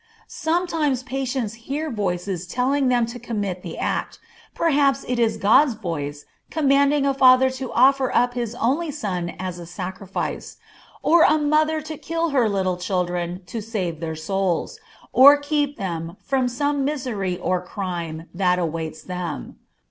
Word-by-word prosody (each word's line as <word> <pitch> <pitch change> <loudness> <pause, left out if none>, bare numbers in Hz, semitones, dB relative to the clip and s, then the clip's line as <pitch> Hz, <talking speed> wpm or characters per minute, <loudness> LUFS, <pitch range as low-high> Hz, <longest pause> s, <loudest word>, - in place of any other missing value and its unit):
Sometimes 320 -6 -1
patients 260 -4 -2 0.2
hear 300 +2 -2
voices 185 -4 -2
telling 260 +6 +1
them 245 -2 +3
to 235 +2 -8
commit 205 -6 -3
the - - -7
act, - - -2 0.4
perhaps 285 -4 +2
it 250 -1 -1
is 230 -2 +2
God's 250 +5 +4
voice 145 -8 -5 0.2
commanding 280 -1 +3
a 275 - +2
father 260 -1 +6
to 260 -1 -6
offer 265 +1 +4
up 245 +1 +2
his 240 -2 -3
only 280 +8 0
son 185 - -3
as 180 -1 -5
a 170 - -9
sacrifice, 185 +2 -5 0.5
or 335 +1 +5
a 310 -1 +6
mother 310 +1 +2
to 310 0 -7
kill 330 0 -1
her 255 -6 +2
little 190 -3 0
children 180 0 -2
to 220 +5 -5
save 190 -7 -3
their 160 -1 -4
souls, 185 +2 -2 0.3
or 280 +3 +9
keep 290 0 -1
them 170 -2 -4
from 265 -2 0
some 285 +3 0
misery 245 -11 -2
or 180 0 -1
crime 175 -4 -5
that 180 -1 +2
awaits 160 -2 -3
them. 180 -3 -5
235 Hz, 150 wpm, -23 LUFS, 180-275 Hz, 0.5 s, or